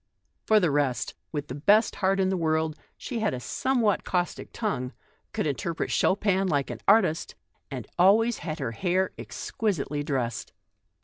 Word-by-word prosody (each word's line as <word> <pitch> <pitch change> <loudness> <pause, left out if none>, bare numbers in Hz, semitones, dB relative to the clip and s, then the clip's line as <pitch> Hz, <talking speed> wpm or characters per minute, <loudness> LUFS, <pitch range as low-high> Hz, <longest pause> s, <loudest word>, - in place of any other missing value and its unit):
For 215 -1 +6
the 175 -6 +2
rest, 135 -5 0 0.2
with 145 -2 -3
the - - -6
best 205 - +3
heart 195 0 +2
in 190 -1 +2
the 190 - +1
world, 160 -2 0 0.2
she 240 - -4
had 215 -10 0
a - - -5
somewhat 230 - +1
caustic 180 -1 -2
tongue, 135 - -2 0.4
could - - -2
interpret 155 +4 -2
Chopin 195 -1 +2
like 140 -7 0
an 115 - -6
artist, 195 -6 +3 0.3
and 130 -6 -5
always 220 +6 +5
had 155 -2 -4
her 135 -7 -3
hair 185 - 0
exquisitely 155 -9 -2
dressed. 130 -6 -2
170 Hz, 160 wpm, -27 LUFS, 140-200 Hz, 0.4 s, For